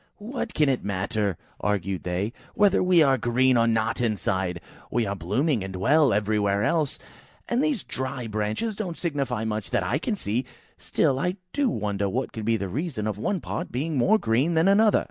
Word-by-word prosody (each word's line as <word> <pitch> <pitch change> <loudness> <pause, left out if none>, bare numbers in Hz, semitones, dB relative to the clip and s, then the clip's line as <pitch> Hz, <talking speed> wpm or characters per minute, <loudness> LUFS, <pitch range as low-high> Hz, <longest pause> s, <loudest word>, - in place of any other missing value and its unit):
"What 230 +2 -5
can 150 - +3
it 130 -2 +1
matter," 100 -1 -1 0.2
argued 100 -2 -1
they, 90 +5 -2 0.2
"whether 205 -2 +4
we 180 -3 +5
are 135 -3 +3
green 125 +3 +3
or 115 -1 +4
not, 110 +1 +1
inside? 95 -5 -1 0.3
We 120 0 +1
are 100 - -2
blooming 110 - 0
and 95 0 -6
well 140 +8 +4
everywhere 105 -1 +1
else, 155 +2 +1 0.5
and 245 +3 +1
these 295 - 0
dry 130 -1 -4
branches 110 - -2
don't 185 -5 -4
signify 140 -9 -2
much 110 -2 -3
that - - +1
I 120 +10 0
can 210 +6 -1
see. 120 - -1 0.4
Still, 135 -1 +1
I 180 +5 0 0.2
do 280 -3 +2
wonder 100 - -1
what 130 +7 -2
can 110 - -5
be 115 +1 +1
the 100 - -3
reason 130 - -3
of 105 -1 -2
one 190 - -1
part 170 - -4
being 150 +6 -2
more 190 - +4
green 135 - +1
than 160 +3 +4
another." 210 +2 +5
120 Hz, 190 wpm, -25 LUFS, 105-165 Hz, 0.5 s, we